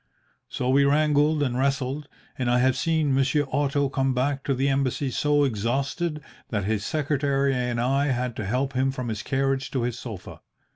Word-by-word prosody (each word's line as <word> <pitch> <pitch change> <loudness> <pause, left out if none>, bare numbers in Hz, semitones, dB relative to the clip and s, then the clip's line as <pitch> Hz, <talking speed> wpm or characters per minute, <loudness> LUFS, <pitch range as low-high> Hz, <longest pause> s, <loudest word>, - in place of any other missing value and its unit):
So 125 - -3
we 135 +2 +4
wrangled 150 +1 +3
and 125 -3 -1
wrestled, 135 +2 -1 0.3
and 125 -2 -1
I 120 - +3
have 130 +1 +3
seen 160 -4 +1
Monsieur 135 +2 +2
Otto 140 +1 +1
come 135 -1 0
back 135 +2 0
to 135 - +1
the 135 +2 0
Embassy 135 0 0
so 145 +2 +2
exhausted 140 - -1 0.3
that 105 -4 -1
his 105 0 -1
secretary 140 -1 0
and 125 -2 -1
I 135 +4 +1
had 125 -2 -1
to 110 - -3
help 130 +5 -1
him 130 +1 +1
from 130 -3 -4
his 110 -1 -3
carriage 135 -1 -1
to 130 -3 -1
his 120 0 -2
sofa. 110 -7 -8
135 Hz, 185 wpm, -25 LUFS, 125-145 Hz, 0.3 s, we